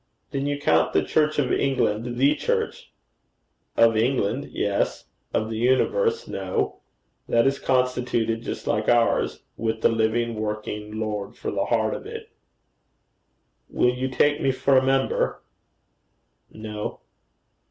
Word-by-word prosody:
'Then 140 +1 -2
you 145 0 -1
count 145 - +2
the - - +3
Church 155 -1 +1
of 140 -4 +1
England 120 -3 0
the 140 +3 +4
Church?' 150 - -2 0.9
'Of 115 -1 +5
England, 120 +2 +1
yes; 100 -1 -1 0.3
of 110 +1 -1
the 110 - -3
universe, 455 - +2
no: - - -2 0.5
that 115 0 +3
is 135 0 +1
constituted 125 -3 0
just - - -6
like 105 0 0
ours, 120 -1 +2
with 110 0 -2
the - - +5
living 115 +1 +1
working 105 0 -4
Lord 105 -2 -3
for - - -4
the - - -1
heart - - +1
of - - -6
it.' - - -8 1.4
'Will 125 - +2
you 130 +1 -2
take 145 +3 +2
me 135 - +3
for 135 +1 +2
a 130 - +5
member?' 135 0 +1 1.1
'No.' 105 -1 -6
120 Hz, 135 wpm, -24 LUFS, 110-135 Hz, 1.4 s, Of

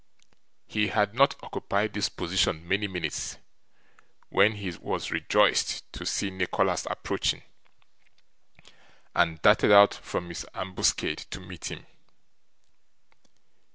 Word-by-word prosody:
He 105 -1 0
had 105 +2 +1
not 140 +3 +4
occupied 100 +1 -2
this 105 - 0
position 85 -2 -1
many 100 +3 +1
minutes, 90 -6 -4 0.9
when 105 +3 +4
he 100 -3 -5
was 85 - -4
rejoiced - - +1
to - - -6
see 100 - -1
Nicholas 95 -1 0
approaching, - - -2 1.7
and 85 -2 +2
darted - - +5
out 100 0 +8
from 85 - -5
his 85 - -5
ambuscade 95 0 0
to - - -6
meet 90 -2 -8
him. - - -9
95 Hz, 110 wpm, -27 LUFS, 90-105 Hz, 1.7 s, out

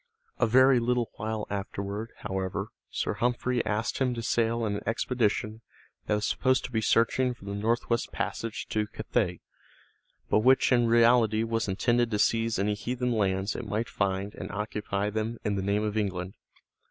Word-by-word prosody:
A 115 - +3
very 130 +2 +6
little 120 0 0
while 110 0 -3
afterward, 100 +2 -4
however, 95 -2 -3 0.2
Sir - - -2
Humphrey 125 0 0
asked 110 +2 -1
him 125 -2 +1
to 115 - -4
sail 115 +1 +1
in 105 -1 -1
an - - -6
expedition 115 -2 0 0.5
that 105 - +2
was 105 - -1
supposed 130 -1 +1
to - - -7
be 110 -2 0
searching 120 +4 +2
for 100 - -15
the 100 - -4
northwest 115 +3 0
passage 115 -1 -3
to 105 -1 0
Cathay, - - -2 0.9
but - - +3
which 130 +5 +4
in 120 -2 +4
reality 115 -1 +4
was 115 -1 -1
intended 120 +5 +1
to 105 - 0
seize 115 +1 +2
any 105 +2 +1
heathen 125 +4 -2
lands 100 -2 0
it 120 - -5
might 105 +3 -1
find 100 0 -1
and - - -7
occupy 105 0 -2
them 110 +2 -2
in 105 - 0
the 100 - -1
name 100 +2 0
of 105 -1 -2
England. 95 -3 -2
110 Hz, 175 wpm, -28 LUFS, 105-120 Hz, 0.9 s, very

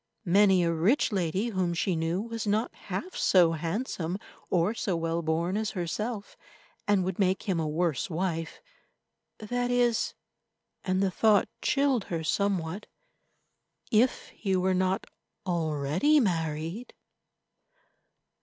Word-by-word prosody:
Many 190 0 +5
a 170 0 +1
rich 195 - +2
lady 190 +3 0
whom 185 -5 -1
she 180 +1 0
knew 165 +4 -1
was 230 -1 -5
not 215 +3 0
half 200 - -6
so 175 -3 +4
handsome 170 - -2 0.3
or 180 +4 +2
so 195 -5 -1
well 165 0 -1
born 165 +3 0
as 215 0 -1
herself, 205 +5 -3 0.5
and 205 -2 +3
would 190 0 -3
make 190 -1 +2
him 185 -4 0
a 160 - -1
worse 160 0 0
wife—that 190 - -5
is, 245 -2 +1 0.7
and 185 +1 +1
the 190 - +1
thought 210 +1 +3
chilled 275 -6 +2
her 165 -2 -3
somewhat—if 200 - -3
he 195 -3 -2
were 185 +1 +2
not 185 +1 0 0.4
already 165 - +2
married. 165 - -2
185 Hz, 120 wpm, -28 LUFS, 165-215 Hz, 0.7 s, Many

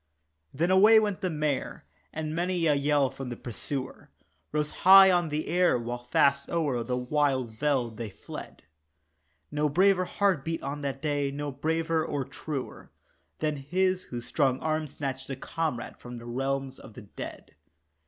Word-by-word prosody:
Then 170 +6 0
away 210 +4 +7
went 205 -3 -1
the 185 - 0
mare, 150 -3 -2 0.3
and 155 0 -4
many 175 0 0
a 155 - +4
yell 145 -1 +2
from 135 -2 -7
pursuer 130 +4 -5 0.4
Rose 150 0 -1
high 190 +1 +9
on 175 -2 +2
the 150 +1 -2
air 180 -6 +3
while 120 +1 -5
fast 140 +2 +2
o'er 145 -8 0
the 125 +2 -2
wild 130 -2 0
veld 120 -2 -1
they 115 -2 -4
fled, - - -10 0.9
No 150 0 +1
braver 185 +4 +3
heart 190 -7 +1
beat 165 0 -3
on 140 +2 -4
that 140 0 -4
day, 145 -2 0
no 145 +1 -4
braver 160 +3 0
or 140 -4 -2
truer 135 0 -6 0.5
Than 150 -1 -1
his 185 +6 0
whose 120 -1 -6
strong 135 -4 +1
arm 155 0 -1
snatched 135 -2 -5
a 135 - -3
comrade 155 -1 -4
from 120 0 -9
realms 135 +3 -3
of 105 - -13
the 125 - -10
dead. 100 - -9
145 Hz, 160 wpm, -28 LUFS, 130-165 Hz, 0.9 s, high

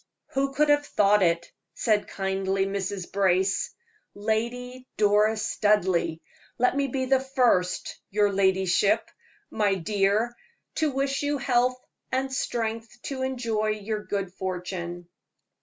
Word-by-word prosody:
"Who 275 0 0
could 295 +2 +2
have 290 0 +4
thought 205 -6 +3
it?" 170 -1 +1 0.2
said 215 -2 +1
kindly 195 0 -1
Mrs. 195 -1 -3
Brace. 190 -1 +2 0.4
"Lady 245 +4 -2
Doris 210 +1 +3
Studleigh, 190 -6 +2 0.4
let 250 +2 +2
me 280 0 +1
be 260 0 -2
the 265 0 +3
first, 250 -9 +1
your 205 0 +2
ladyship 190 0 +2 0.4
my 205 -2 +2
dear 205 +5 +1 0.4
to 315 -1 +2
wish 275 0 -1
you 290 0 0
health 250 -1 +1 0.3
and 265 +1 -1
strength 230 -2 -3
to 270 -2 -4
enjoy 235 -5 -1
your 215 0 -2
good 195 -3 -3
fortune." 180 -2 -5
210 Hz, 125 wpm, -26 LUFS, 195-255 Hz, 0.4 s, have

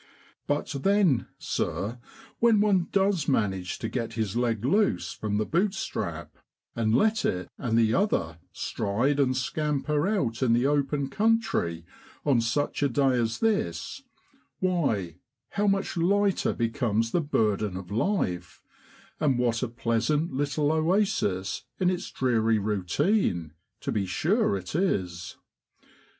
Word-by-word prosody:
But 145 +1 0
then, 195 - +3
sir, 115 +5 -3 0.4
when 230 -2 +5
one 195 -4 +3
does 195 -5 +1
manage 95 -9 0
to - - -4
get 115 -3 -3
his 110 -2 -2
leg 120 -2 0
loose 200 +9 +2
from 105 -1 -2
the 110 - 0
boot 190 - +1
strap, - - -5 0.4
and 110 -1 +1
let 220 - +2
it 90 -1 -1
and 115 -4 0
the 115 -1 +3
other 85 - 0
stride 115 +7 -1
and 130 -2 +2
scamper 150 +3 0
out 140 - -1
in 120 -3 +3
the 120 +2 +2
open 140 0 +1
country 205 - +1 0.4
on 135 -5 +3
such 130 +7 -1
a 140 - +3
day 135 +1 +2
as 115 -2 -1
this, 225 +4 -1 0.6
why, 125 - 0 0.3
how 205 +1 0
much 195 -1 0
lighter 195 +3 +2
becomes 115 -2 0
the 175 - +2
burden 105 - 0
of 95 0 -9
life, 95 - -1 0.6
and 140 -5 +2
what 120 -2 +1
a 130 - 0
pleasant 120 +7 0
little 145 +2 0
oasis 160 - 0
in 185 -1 +3
its 180 - -4
dreary 115 -3 +1
routine, 100 - 0 0.3
to - - -2
be 100 -3 -1
sure 165 - +1
it 90 -1 -8
is 95 - -1
130 Hz, 135 wpm, -27 LUFS, 110-175 Hz, 0.6 s, when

